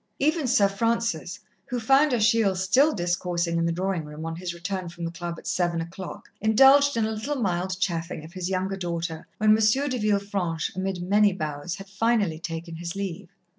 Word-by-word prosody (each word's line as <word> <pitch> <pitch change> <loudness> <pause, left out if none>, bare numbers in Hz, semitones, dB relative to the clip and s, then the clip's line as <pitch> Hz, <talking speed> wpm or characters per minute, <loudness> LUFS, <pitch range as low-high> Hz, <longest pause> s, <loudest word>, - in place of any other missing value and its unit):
Even 305 0 +1
Sir 215 -5 +4
Francis, 205 -3 -1 0.3
who 250 -2 -2
found 270 +6 +4
Achille 220 -4 +3
still 255 +12 +3
discoursing 175 - -1
in 165 - +1
the - - +1
drawing 185 0 -1
room 150 +1 -8
on 165 0 -4
his 180 0 -4
return 175 +1 -4
from 170 0 -6
the 165 - -3
Club 170 0 -5
at - - -13
seven 175 -2 0
o'clock, 170 +3 -7
indulged 270 +5 +6
in 225 - +2
a 220 - -2
little 220 +7 -3
mild 185 -5 -1
chaffing 165 -4 -2
of 165 - -13
his 185 -1 -3
younger 190 +1 -1
daughter 170 -3 -4
when 215 0 +4
M. 220 +7 +2
de 255 -1 -2
Villefranche 200 -6 -1
amid 190 -1 -2
many 205 +2 +4
bows, 155 0 -4
had 195 0 -10
finally 200 -4 +1
taken 165 -1 -6
his 170 +1 -5
leave. 195 -2 -5
190 Hz, 190 wpm, -26 LUFS, 170-220 Hz, 0.3 s, indulged